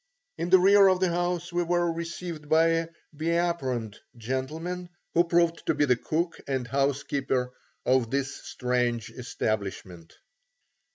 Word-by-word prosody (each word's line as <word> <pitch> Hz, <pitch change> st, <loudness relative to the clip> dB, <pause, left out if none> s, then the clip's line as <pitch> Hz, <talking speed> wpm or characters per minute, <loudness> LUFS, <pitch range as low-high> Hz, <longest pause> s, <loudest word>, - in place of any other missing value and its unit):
In 175 Hz, -, -1 dB
the 185 Hz, -, +8 dB
rear 195 Hz, +2 st, +6 dB
of 185 Hz, -1 st, +3 dB
the 185 Hz, -1 st, +2 dB
house 175 Hz, 0 st, -1 dB
we 175 Hz, -, +1 dB
were 175 Hz, 0 st, +1 dB
received 170 Hz, -2 st, -6 dB
by 160 Hz, +1 st, +5 dB
a 165 Hz, 0 st, +1 dB, 0.3 s
be 155 Hz, +3 st, -2 dB
aproned 130 Hz, -11 st, -2 dB, 0.2 s
gentleman 155 Hz, +10 st, -4 dB, 0.2 s
who 170 Hz, -, +5 dB
proved 170 Hz, -1 st, +2 dB
to -, -, +2 dB
be 145 Hz, -, +3 dB
the 125 Hz, -3 st, +4 dB
cook 165 Hz, +7 st, -2 dB
and 130 Hz, -3 st, -2 dB
housekeeper 135 Hz, -1 st, 0 dB, 0.3 s
of 130 Hz, -2 st, +3 dB
this 140 Hz, +2 st, -1 dB
strange 125 Hz, -2 st, -1 dB
establishment. 100 Hz, -8 st, -4 dB
155 Hz, 145 wpm, -27 LUFS, 125-175 Hz, 0.3 s, the